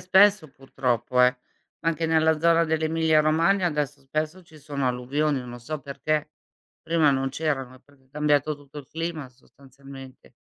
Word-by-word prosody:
spesso 190 -2 +4
purtroppo, 125 -2 -1
eh. 125 0 +4 0.5
Anche 165 0 0
nella 160 -1 +2
zona 170 0 +4
dell'Emilia 160 0 +2
Romagna 170 +5 +2
adesso 150 -2 -3
spesso 155 +6 -4
ci 160 -2 -17
sono 140 -3 -2
alluvioni, 135 +4 -1
non 120 -1 -9
so 155 +5 -5
perché. 150 +2 -2 0.5
Prima 160 -3 +3
non 135 0 0
c'erano, 135 -3 -3
è - - -21
proprio 135 -2 -27
cambiato 150 0 +1
tutto 145 +1 -12
il 135 - -11
clima 160 -4 -5
sostanzialmente. 135 +1 -15
150 Hz, 150 wpm, -25 LUFS, 135-160 Hz, 0.5 s, spesso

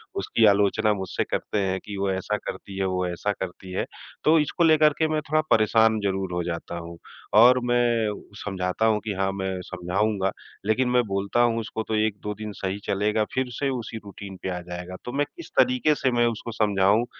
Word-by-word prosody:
उसकी 115 - +2
आलोचना 105 +2 +3
मुझसे 95 -2 -2
करते 105 - -2
हैं 95 -1 0
कि 100 -1 -6
वो 100 0 0
ऐसा 95 +3 -1
करती 100 -2 -7
है, 95 - 0
वो 90 -1 0
वैसा 90 +4 -2
करती 95 0 -6
है। 90 - -1 0.4
तो 160 +2 +5
इसको 150 +3 0
लेकर 155 -2 +5
के 160 - +3
मैं 155 -1 0
थोड़ा 155 +1 +3
परेशान 110 0 +4
ज़रूर 95 -2 -1
हो 90 0 -1
जाता 85 0 -4
हूँ। 85 0 -8 0.4
और 125 +2 +7
मैं 120 -2 +2 0.4
समझाता 95 +1 -1
हूँ 110 -1 +3
कि 105 - 0
हाँ, 95 0 0
मैं 95 -1 -3
समझाऊँगा, 95 +3 -1 0.3
लेकिन 125 +4 +2
मैं 125 0 +3
बोलता 100 +4 0
हूँ 115 -1 +3
उसको 110 0 -4
तो 110 - -1
1-2 105 -1 -1
दिन 105 0 -6
सही 95 0 -3
चलेगा, 105 +2 +1
फ़िर 130 -1 0
से 140 +4 -1
उसी 120 -3 -4
रूटीन 100 -1 -9
पे 95 - -2
आ - - -4
जाएगा। 90 +1 -7
तो 120 - -4
मैं 145 +2 +1
किस 340 - -10
तरीके 255 -12 +4
से 130 -3 +1
मैं 120 0 +3
उसको 115 0 -4
समझाऊँ, 105 +1 +3
105 Hz, 200 wpm, -25 LUFS, 95-120 Hz, 0.4 s, और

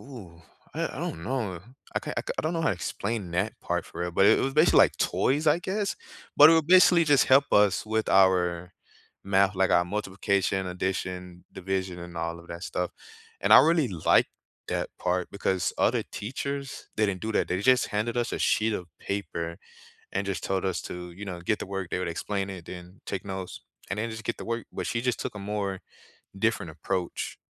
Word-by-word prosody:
ooh, 100 -12 -12 0.3
I - - -1
I - - -7
don't 80 - -4
know, 110 -10 -2 0.3
I - - +2
can't - - -6
I - - -2
k - - -3
don't 160 +2 -1
know 165 - -1
how - - +3
to - - +1
explain 100 -4 -3
that 95 +5 0
part - - -2
for - - -9
real, 90 0 -2
but 95 - +4
it 110 - +5
was 135 0 -1
basically 155 +3 +5
like - - -12
toys, 150 +4 +1
I 150 - +5
guess? 200 +2 -2 0.4
But 150 - +11
it - - +6
would 160 - +1
basically 180 -2 +7
just 145 -4 +4
help 135 +2 +5
us 105 -2 +4
with 110 0 -1
our 90 -2 +3 0.5
math, 100 0 +3
like 95 0 +2
our 85 - +4
multiplication, 95 0 -1
addition, 90 -1 -4
division, 95 -1 -3
and 85 0 -9
all 85 +1 -3
of 85 - -17
that 85 +1 -7
stuff, 90 0 -2 0.5
and 100 - +4
I 110 - +11
really 160 -2 +3
liked 85 -5 +3 0.4
that - - -1
part 90 0 -1
because 95 -3 0
other - - +2
teachers, 140 +5 -5
they 110 - +3
didn't 95 -2 -2
do 110 0 -2
that, - - +1
they 90 +1 -1
just 130 +4 +4
handed 110 +3 -2
us 120 -1 -1
a - - -2
sheet 110 +1 +2
of 90 - -5
paper 85 -4 -4 0.5
and 100 +1 -1
just 100 - -3
told 95 -1 -1
us 95 - -2
to, 90 0 -7
you 100 +4 -8
know, 90 -2 -5
get 105 +5 0
the - - -4
work, 95 -2 -4
they - - -1
would 90 - -2
explain 100 -1 -2
it, 90 -3 -9
then 90 +1 -10
take 95 -2 -4
notes, 95 -2 -6 0.3
and 100 - -2
then 115 +2 -2
just 110 0 -7
get 115 - -2
the - - -7
work, 115 0 -3
but - - -4
she 115 - -1
just 125 -1 0
took - - -4
a 105 - -6
more 100 -2 -3 0.6
different 95 -5 0
approach 90 0 -3
100 Hz, 215 wpm, -27 LUFS, 90-115 Hz, 0.6 s, But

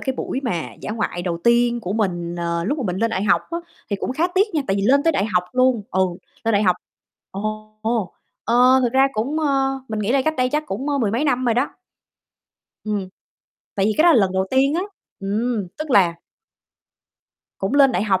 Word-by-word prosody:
cái 265 -1 -2
buổi 265 - -3
mà 165 - -2
dã - - -5
ngoại 205 -5 -2
đầu 170 -2 -2
tiên 240 0 +3
của 185 -1 -4
mình, 175 -5 -2
ờ, 170 0 -2
lúc 290 +9 -1
mà 260 - -2
mình 180 0 -2
lên 230 +2 0
đại 190 -2 -1
học - - +3
á, 335 - -2 0.3
thì 200 - 0
cũng 255 - -3
khá 320 +6 +1
tiếc 400 -1 +2
nha, 295 - +1
tại 195 - 0
vì 195 - -1
lên 275 +7 +4
tới 330 0 +3
đại 195 - +1
học 180 -4 +1
luôn 255 -3 +2
ừ, 190 - 0 0.4
lên 225 - +2
đại 205 +1 +3
học 180 -2 +3 0.5
ồ, 215 +2 -5
ồ, 220 -4 -1 0.3
ờ, 250 +2 +5
thực 245 -1 +1
ra 270 +1 +4
cũng 265 +9 -1
ơ, 270 -2 +1
mình 215 -1 -3
nghĩ 210 +4 0
là 270 -1 +3
cách 315 +2 0
đây 255 -1 +2
chắc 300 0 0
cũng, 255 +10 -4
ơ, 285 -1 0
mười 215 -5 +1
mấy 240 +7 0
năm 255 -3 +1
rồi 235 -2 +2
đó. 255 +4 +1 1.1
Ừm, 205 -3 -2 0.7
tại 195 0 +1
vì 215 - +2
cái 310 - +5
đó - - +7
là - - +5
lần 190 -1 +1
đầu 190 0 +1
tiên 275 +3 +3
á, 355 - 0 0.4
ừm, 210 0 -1
tức 310 -2 -5
là 180 -7 +4 1.4
Cũng 195 +7 -2
lên 275 -2 +6
đại 195 - 0
học 190 -3 +2
230 Hz, 230 wpm, -21 LUFS, 195-270 Hz, 1.4 s, đó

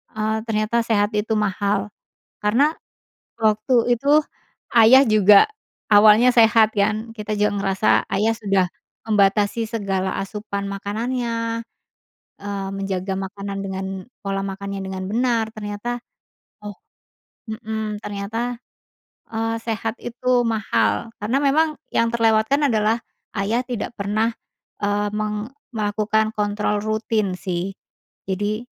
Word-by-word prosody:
eee, 220 0 0
ternyata 220 +1 +1
sehat 205 -2 +2
itu 210 +1 0
mahal. 200 0 0 0.6
Karena, 245 +9 +3 0.7
waktu 225 +3 +3
itu, 290 +4 +4 0.5
Ayah 240 +3 +8
juga 210 -2 +7 0.5
awalnya 215 +4 +7
sehat, 225 -2 +5
kan. 215 +2 0
Kita 215 -1 -4
juga 210 0 +2
ngerasa 195 +1 0 0.2
Ayah 210 +3 +2
sudah 195 -4 +1 0.4
membatasi 210 +1 +2
segala 195 -4 -2
asupan 200 0 -5
makanannya. 230 +3 -2 0.8
Eee, 200 -1 -4
menjaga 195 -1 -2
makanan 200 +1 -5
dengan 190 0 -4 0.4
pola 195 -1 -2
makannya 200 0 -5
dengan 190 0 -5
benar, 230 -1 +1
ternyata, 210 +3 -4 0.7
oh 205 -1 -7 0.8
mhm, 220 -1 -4
ternyata, 220 +4 -3 0.7
eee, 225 0 -1
sehat 225 -1 -2
itu 245 +1 +1
mahal. 225 +1 0
Karena 230 +6 +1
memang 305 +2 +2 0.2
yang 230 - +3
terlewatkan 230 +5 +3
adalah 220 -1 +2 0.4
Ayah 215 +5 0
tidak 240 -2 -4
pernah, 215 +3 0 0.5
eee, 205 0 +1
meng 210 +1 -3 0.2
melakukan 215 0 0
kontrol 210 0 0
rutin, 215 -2 -1
sih. 185 +1 -3 0.6
Jadi, 205 +4 -1
215 Hz, 110 wpm, -22 LUFS, 200-230 Hz, 0.8 s, Ayah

